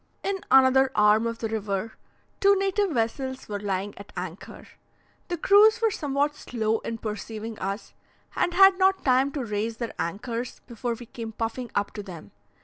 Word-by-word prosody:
In 390 0 -1
another 265 0 +6
arm 210 +2 +4
of 230 0 -3
the 225 - -3
river, 215 -1 -3 0.5
two 400 0 +5
native 390 +1 +1
vessels 260 0 -2
were 205 -1 -4
lying 200 0 -2
at 200 - -11
anchor. 180 +1 -7 0.6
The 350 - -3
crews 420 +6 +6
were 450 -2 +2
somewhat 290 -2 0
slow 225 -6 -2
in 230 - -5
perceiving 220 0 -6
us, 195 +3 -4 0.4
and 350 - 0
had 385 0 +7
not 380 0 +3
time 265 +1 +3
to 275 -5 -3
raise 215 +1 -2
their 235 -1 -4
anchors 230 +8 -4
before 235 0 -4
we 240 - -10
came 225 -1 -7
puffing 230 +2 -4
up 205 - 0
to 210 - -6
them. 170 - -10
230 Hz, 170 wpm, -26 LUFS, 210-285 Hz, 0.6 s, had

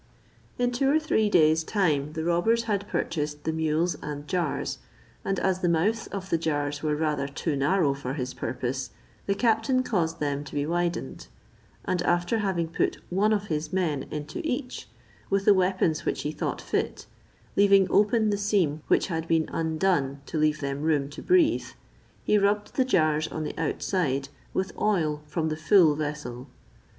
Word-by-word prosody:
In 245 0 +1
two 270 +2 +1
or 295 - +4
three 220 -9 +1
days' 160 -3 +4
time 155 -7 0
the 160 -1 -3
robbers 175 +8 +2
had 205 -3 -2
purchased 150 -5 -2
the 160 - -1
mules 160 +2 0
and 145 0 -6
jars, 175 -5 -2 0.4
and 195 - -1
as 190 -1 +1
the 180 - +1
mouths 205 +7 +1
of 190 -1 -6
the 165 - +2
jars 145 -3 -1
were 150 -1 0
rather 150 -2 -1
too 145 +2 -2
narrow 145 +1 +2
for 135 -1 -5
his 130 -3 -4
purpose, 130 -1 -3 0.4
the 200 - +1
captain 230 +3 +2
caused 170 -9 -1
them 145 -1 -1
to - - -9
be 145 0 0
widened; 170 - -2 0.6
and 180 - 0
after 175 +6 +1
having 190 -5 0
put 165 - -1
one 205 +4 +2
of 205 -2 +1
his 155 -3 -3
men 160 -7 -1
into 150 - -5
each, 255 -4 -4 0.4
with 195 0 +1
the 205 - +7
weapons 185 -4 +1
which - - -2
he 150 - -2
thought - - -3
fit, - - -2 0.5
leaving 200 -1 +6
open 215 +1 +3
the 205 - -1
seam 190 -7 +1
which - - +3
had 165 -3 -3
been 165 -1 +2
undone 160 -4 0
to 160 - -3
leave 155 0 +2
them 140 0 -3
room 150 -3 +1
to 150 - -8
breathe, 345 -3 +3 0.6
he 210 - +3
rubbed 205 +1 +1
the 260 - +3
jars 155 -9 +2
on 155 - -4
the 150 - -5
outside 145 -4 -1 0.2
with 190 0 -2
oil 160 -8 +1
from 160 +1 -1
the 155 - -2
full 160 0 +5
vessel. 145 -4 -5
165 Hz, 175 wpm, -26 LUFS, 150-200 Hz, 0.6 s, the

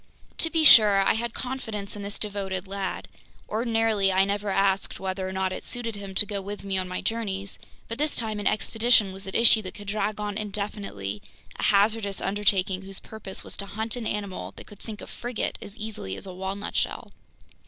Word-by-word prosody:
To 325 - +2
be 325 -1 +2
sure, 210 -8 +9
I - - +4
had 235 +1 -3
confidence 225 -6 -4
in 205 - -6
this 200 0 -4
devoted 195 -2 -3
lad. 195 0 -3 0.4
Ordinarily, 225 -3 +2
I 190 +1 +4
never 200 +1 -1
asked 195 0 +1
whether 190 0 -2
or - - -5
not 190 0 0
it - - -6
suited 240 -2 -4
him 200 -1 -7
to 210 - +8
go 200 -1 -3
with 200 +1 -6
me 195 -1 -2
on 185 - -2
my 180 - -3
journeys; 200 -4 -3 0.3
but 230 - -5
this 300 0 +1
time 220 -2 0
an 205 - 0
expedition 220 -2 +3
was 195 +1 -8
at 190 - -6
issue 230 -1 +7
that 185 -3 -7
could 205 -1 -9
drag 210 0 -1
on 210 0 -2
indefinitely, 200 - -4 0.3
a - - -5
hazardous 205 -1 +3
undertaking 195 -2 +1
whose 195 0 -4
purpose 220 -3 -8
was - - -5
to 200 - -4
hunt 220 +3 -3
an 235 -3 -3
animal 200 -3 -4
that - - -10
could 205 -2 -14
sink 215 -2 -5
a - - -7
frigate 240 -2 -3
as 205 - -9
easily 215 - -4
as - - -8
a 185 - -7
walnut 190 +2 -4
shell! - - -1
205 Hz, 205 wpm, -26 LUFS, 195-220 Hz, 0.4 s, sure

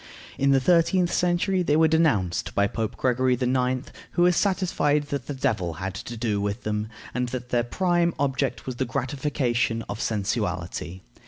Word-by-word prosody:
In 140 - +3
the 135 -1 +5
thirteenth 175 +4 +3
century 180 +2 +1
they 150 -4 +2
were 160 +1 +5
denounced 145 - +1
by 100 - +4
Pope 110 +2 -3
Gregory 130 0 +2
IX., 125 +1 0 0.2
who 175 - +3
was 180 0 +4
satisfied 175 -7 +1
that 140 -3 -3
the 145 - -3
devil 95 -9 -1
had 95 +2 -4
to 115 +5 -7
do 110 -3 -1
with 105 +3 -3
them, 105 0 -2 0.2
and 125 0 -1
that 125 0 -5
their 120 -2 +2
prime 175 +5 +1
object 135 -1 -1
was 130 -2 -5
the 130 - 0
gratification 125 -3 -1
of 105 - -5
sensuality. 95 -3 -2
130 Hz, 170 wpm, -25 LUFS, 115-160 Hz, 0.2 s, the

